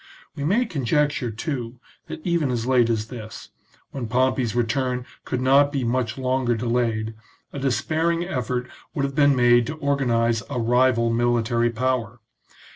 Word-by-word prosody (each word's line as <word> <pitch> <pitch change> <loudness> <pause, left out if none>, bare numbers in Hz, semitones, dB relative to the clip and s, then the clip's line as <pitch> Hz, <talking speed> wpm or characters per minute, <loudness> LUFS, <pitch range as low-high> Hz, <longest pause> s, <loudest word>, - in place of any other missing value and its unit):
We 140 - -5
may 205 - +2
conjecture, 145 - 0
too, 120 0 -5 0.3
that 155 - -8
even 170 -5 +1
as 120 -2 -2
late 125 -2 +3
as 110 -1 -1
this, 110 -4 -9 0.4
when 130 -4 -5
Pompey's 125 -1 +1
return 125 +1 0 0.2
could 125 - -2
not 140 +2 +4
be 140 -3 -1
much 120 -1 -1
longer 130 -2 0
delayed, 115 -1 -1 0.4
a 140 - -5
despairing 160 +5 0
effort 125 -4 -2 0.3
would 140 - 0
have 135 - -4
been 145 0 +4
made 120 -1 +4
to 155 - -4
organize 120 -6 +1
a 125 - -2
rival 120 0 +2
military 120 0 +1
power. 120 -1 -2
125 Hz, 150 wpm, -23 LUFS, 115-140 Hz, 0.4 s, not